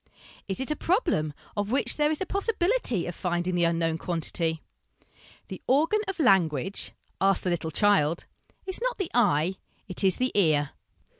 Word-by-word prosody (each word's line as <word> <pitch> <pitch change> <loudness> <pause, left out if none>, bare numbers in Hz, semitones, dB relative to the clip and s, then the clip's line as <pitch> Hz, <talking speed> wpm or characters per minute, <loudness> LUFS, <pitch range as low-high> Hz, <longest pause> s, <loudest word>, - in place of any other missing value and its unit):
Is 195 +2 -3
it 265 +3 -2
a - - +1
problem 330 - 0 0.2
of 205 0 -2
which 265 +4 +1
there 300 0 +2
is 310 - -1
a - - 0
possibility 395 - 0
of 175 - -4
finding 175 +1 -2
the 175 -1 +2
unknown 165 -1 0
quantity?... 165 -1 -2 0.8
The - - -8
organ 315 +11 +3
of 390 -2 -4
language 190 - +1 0.3
ask 195 0 +3
the 180 - 0
little 165 -2 -2
child 170 -3 +2 0.4
is 375 +3 -2
not - - -1
the 385 -5 -3
eye: 190 -6 +2 0.3
it 185 +1 -3
is 190 -2 +4
the 255 0 0
ear. 155 -7 +2
195 Hz, 165 wpm, -27 LUFS, -, 0.8 s, is